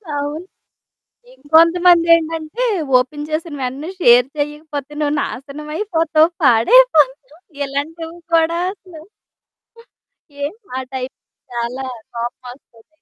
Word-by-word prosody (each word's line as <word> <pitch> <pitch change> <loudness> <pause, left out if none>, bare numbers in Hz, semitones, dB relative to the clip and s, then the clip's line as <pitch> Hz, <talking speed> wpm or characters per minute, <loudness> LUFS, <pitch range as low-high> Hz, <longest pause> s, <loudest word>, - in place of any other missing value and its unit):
అవును. 295 +4 -4 0.9
ఇంకొంతమందేంటంటే 335 +3 +3 0.3
open 295 +4 -2
చేసినవెంటనే 295 -2 -4
share 245 -1 +6
చేయకపోతే 295 -1 -5
నువ్వు 295 -1 0
నాశనమైపోతావు 310 - -1
పాడైపోతావు. 295 - +4 0.2
ఇలాంటివి 320 +4 -5 0.2
కూడా 330 +1 +2
అసలు. 365 -6 -14 1.4
ఏ - - +1 0.3
ఆ - - -2
టైం 260 0 -4 0.4
చాలా 240 +3 -4 0.3
కోపమోస్తది. 240 0 -8
300 Hz, 80 wpm, -18 LUFS, 265-330 Hz, 1.4 s, share